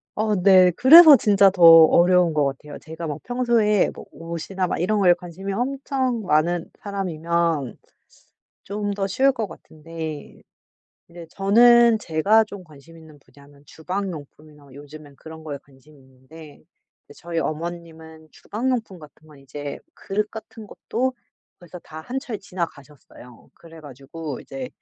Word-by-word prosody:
어 215 0 -1
네. 185 -1 +5
그래서 305 - +8
진짜 200 -5 +3
더 185 -1 -8
어려운 170 +1 +6
것 150 -1 +1
같아요. 140 +2 -5
제가 160 +1 -8
막 150 0 -6
평소에 235 -4 +1
뭐 - - -12
옷이나 170 +3 -5
막 - - -4
이런 210 +5 0
거에 180 -3 +5
관심이 180 +2 -8
엄청 260 0 -3
많은 170 0 0
사람이면 170 - -3 0.9
좀 205 0 -4
더 195 -1 -3
쉬울 265 +8 +2
것 230 -5 -5
같은데 160 -2 -10 0.7
근데 170 -1 -13
저는 235 +4 +4
제가 205 +5 +1
좀 200 -2 -11
관심 160 0 -18
있는 160 -2 -17
분야는 140 +2 -22
주방 185 +4 -5
용품이나 150 -1 -14
요즘엔 145 +1 -14
그런 160 +3 -12
거에 145 -3 -7
관심이 140 +2 -22
있는데 135 +4 -17 0.4
이제 - - -16
저희 165 0 -5
어머님은 160 -1 -7
주방 240 +5 -5
용품 225 -7 -4
같은 150 +1 -17
건 150 -2 -18
이제 140 +1 -8 0.2
그릇 210 +2 -4
같은 220 0 -11
것도 255 +6 -3 0.5
벌써 175 0 -12
다 155 -1 -11
한철 245 0 -6
지나가셨어요. 150 - -10
그래 165 -1 -16
가지고 145 +1 -9
이제 265 -2 -8
170 Hz, 295 characters per minute, -22 LUFS, 155-205 Hz, 0.9 s, 그래서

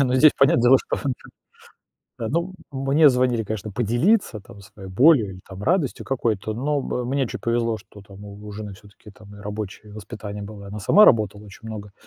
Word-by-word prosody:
не 140 - +5
ну 125 0 0
здесь 150 +3 +6
понятное 135 -3 +4
дело, 130 +2 +6
что. 140 - -2 1.1
Да, 115 - -3
ну, 170 +7 -1 0.2
м, 135 - -5
мне 145 +3 +5
звонили, 125 -3 +1
конечно, 110 0 -5
поделиться 120 - +1
там 100 +1 -15
своей 100 -1 -12
болью 120 - +4
или 95 0 -11
там 95 +1 -9
радостью 165 - 0
какой-то, 110 -5 -2
но 140 +6 -1
м 125 -2 -3
мне 135 -1 0
чуть - - -6
повезло, 115 -1 0
что 105 +1 -16
там 100 0 -13
у 100 +1 -11
у 105 - -8
жены 105 -1 -7
всё-таки 100 +1 -17
там 105 0 -15
и - - -13
рабочее 105 -1 -7
воспитание 105 0 -8
было, 100 -1 -9
она 105 +2 -7
сама 210 - +6
работала 105 -3 +3
очень 105 +3 -12
много. 105 -2 -8
110 Hz, 205 wpm, -23 LUFS, 100-130 Hz, 1.1 s, здесь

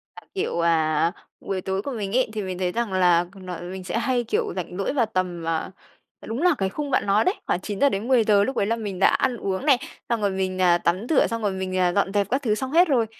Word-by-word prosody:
À, - - -11
kiểu, 380 - -1
à, 165 -1 +2 0.3
buổi 190 -1 -3
tối 190 +1 -2
của 280 - -5
mình 205 -3 -4
ấy 255 - +2
thì 215 - -2
mình 185 -2 -4
thấy 180 -1 -1
rằng 230 -2 -2
là 175 -2 +4
nó 185 -3 -7
mình 185 +1 -7
sẽ 185 - -3
hay, 245 -1 0
kiểu, 230 - -1
rảnh 180 -1 -5
rỗi 195 +7 -1
vào 245 -5 +2
tầm, 180 -5 -3
à, 165 +2 -1 0.5
đúng 230 +7 -4
là 360 0 +4
cái 190 -1 0
khung 285 +7 -4
bạn - - +2
nói 200 +2 +3
đấy, 370 - +2
khoảng - - +1
9:00-10:00, 215 -1 +2
lúc 265 - -2
đấy - - +2
là 225 +3 0
mình 205 -5 -5
đã - - +6
ăn 250 -2 +1
uống 195 +5 -3
này, 280 -4 +5 0.3
xong 235 -2 0
rồi 205 - +2
mình, 185 -1 -2
à, 175 -1 +5
tắm 180 +5 0
rửa, 315 - +4
xong 230 0 -3
rồi 205 - 0
mình, 190 -1 -3
à, 180 -1 +2
dọn 200 -1 +1
dẹp 200 -2 +1
các 265 +3 0
thứ 215 -5 +1
xong 265 +3 -4
hết 345 +3 +5
rồi, 245 -6 +2
200 Hz, 260 wpm, -24 LUFS, 185-235 Hz, 0.5 s, đã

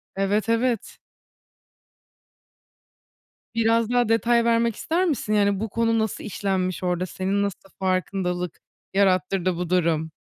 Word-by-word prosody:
Evet, 205 +3 0
evet. 230 -1 0 2.6
Biraz 230 0 +2
daha 245 -2 +2
detay 235 +1 +3
vermek 230 -1 +2
ister 345 +4 0
misin? 270 -9 -1
Yani 200 -2 +2
bu 220 +1 -3
konu 230 +1 +1
nasıl 220 -2 -2
işlenmiş 190 -3 -2
orda? 180 0 0
Senin 195 +2 -1
nasıl 195 -1 -5
farkındalık 185 -2 -1 0.3
yarattırdı 185 -2 +2
bu 175 -1 -4
durum? 165 -3 +1
200 Hz, 115 wpm, -24 LUFS, 185-230 Hz, 2.6 s, detay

